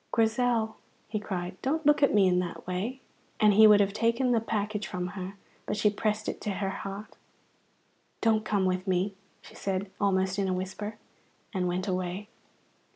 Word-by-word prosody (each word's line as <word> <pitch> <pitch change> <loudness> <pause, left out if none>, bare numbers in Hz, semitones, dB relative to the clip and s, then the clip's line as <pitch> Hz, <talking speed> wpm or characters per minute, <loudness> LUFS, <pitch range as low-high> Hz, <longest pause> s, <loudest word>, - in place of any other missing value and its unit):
"Grizel," 225 -1 +1 0.3
he 215 0 -1
cried, 185 -3 -5
"don't 315 +4 -1
look 295 0 +5
at 280 - +5
me 200 -2 +5
in 180 -1 +3
that 175 -1 -4
way!" 205 +9 -3 0.4
And 210 -1 +6
he 215 +2 +8
would 210 -1 +7
have 200 -1 +2
taken 230 +4 +2
the 235 - +4
package 210 -1 -2
from 180 0 -3
her, 190 0 -6 0.3
but 210 - -1
she 210 0 +3
pressed 215 +1 -1
it - - -4
to 205 - -2
her 195 0 -2
heart. 195 +2 -7 1.0
"Don't 220 -1 +2
come 205 -3 +1
with 185 +1 0
me," 190 +2 +1 0.3
she - - -14
said 190 0 -3
almost 190 -1 +2
in 195 - +1
a 185 - +1
whisper, 190 +3 -5 0.6
and 185 -2 0
went 180 +2 -1
away. 185 +2 -2
205 Hz, 180 wpm, -29 LUFS, 185-215 Hz, 1.0 s, he